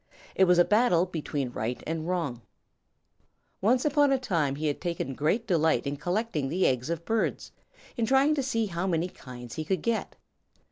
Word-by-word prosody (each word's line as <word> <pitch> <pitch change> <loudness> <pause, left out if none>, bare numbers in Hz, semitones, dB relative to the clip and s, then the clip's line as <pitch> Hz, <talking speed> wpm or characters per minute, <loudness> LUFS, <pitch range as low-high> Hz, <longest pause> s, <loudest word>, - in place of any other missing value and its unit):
It 190 - +4
was 180 -1 +4
a 175 - +6
battle 210 -3 +3
between 150 -7 -3
right 120 +2 -4
and 160 0 -3
wrong. 165 -10 -2 1.2
Once 245 +7 +3
upon 290 -1 +3
a 270 - +4
time 165 - 0
he 155 +2 -4
had 145 -2 -1
taken 170 -6 -3
great 160 - 0
delight 160 -7 +2
in 140 +1 -2
collecting 175 - -2
the 180 +5 +1
eggs 130 +3 +1
of 170 0 -3
birds, 225 0 -1 0.4
in 230 -3 0
trying 270 +4 +4
to 295 - 0
see 230 -4 0
how 180 -1 -3
many 170 -1 0
kinds 125 -6 -10
he 155 - -2
could 180 +1 -2
get. 230 -1 -1
175 Hz, 185 wpm, -28 LUFS, 150-225 Hz, 1.2 s, a